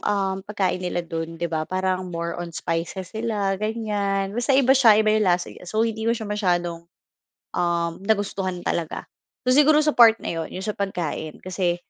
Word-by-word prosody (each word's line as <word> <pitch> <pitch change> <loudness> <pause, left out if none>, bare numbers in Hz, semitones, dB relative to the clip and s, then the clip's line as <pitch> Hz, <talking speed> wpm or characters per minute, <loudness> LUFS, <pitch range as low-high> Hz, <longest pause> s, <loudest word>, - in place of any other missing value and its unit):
um, 195 -2 0
pagkain 190 -3 0
nila 175 -1 -2
do'n, 165 0 -5
'di 170 - -3
ba? 155 0 -2
Parang 185 0 -1
more 170 -1 -3
on 175 - -4
spices 170 +3 -4
sila, 210 -3 -1
ganyan. 205 -3 -1
Basta 240 +4 +1
iba 265 -1 +5
siya, 235 -6 +6
iba 215 - +4
'yong 215 - +3
lasa 175 0 +1
niya. 180 - -12
So 220 +3 +1
hindi 220 0 -2
ko 230 - +2
siya 220 - -6
masyadong, 175 -5 -1 0.7
um, 170 -1 +1
nagustuhan 195 -4 -1
talaga. 165 -2 -2 0.4
So 255 - +3
siguro, 300 +1 +6
sa 300 - +3
part 230 -2 +8
na - - -3
'yon 165 -1 -4
'yon 185 - -5
sa 210 - -1
pagkain 170 -6 -3
kasi 180 -1 0
190 Hz, 185 wpm, -23 LUFS, 175-215 Hz, 0.7 s, part